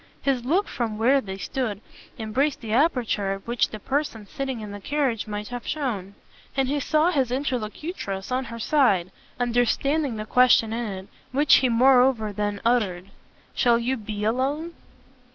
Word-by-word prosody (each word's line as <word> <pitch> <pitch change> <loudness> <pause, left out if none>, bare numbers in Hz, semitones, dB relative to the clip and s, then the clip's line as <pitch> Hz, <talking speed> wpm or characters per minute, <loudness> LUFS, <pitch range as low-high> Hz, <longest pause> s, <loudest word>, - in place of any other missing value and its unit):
His 265 -3 +1
look 360 +10 +2
from 225 -3 -3
where 260 +5 +4
they 190 -4 -6
stood 215 0 -3 0.4
embraced 255 +7 -1
the 220 -2 -4
aperture 235 -8 +1
at 195 0 -8
which 235 -1 +1
the 215 - -7
person 265 -2 -2
sitting 270 0 -4
in 210 -1 -7
the 205 - -7
carriage 260 -2 -1
might 210 0 -5
have 245 -1 -6
shown, 210 -10 -3 0.4
and 270 -1 +2
he 290 +2 0
saw 310 +4 +2
his 270 -7 +1
interlocutress, 250 - -3
on 255 +1 0
her 230 - -7
side, 225 - +2 0.3
understand 245 +3 +1
the 215 - -4
question 245 -2 +4
in 235 +1 -2
it, 190 -1 -6 0.2
which 285 +2 +5
he 260 - +2
moreover 250 -2 +4
then 205 0 -2
uttered. 195 -6 +1 0.4
"Shall 240 -2 +3
you 240 +3 0
be 210 -3 -5
alone?" 275 +9 -1
240 Hz, 165 wpm, -25 LUFS, 215-270 Hz, 0.4 s, which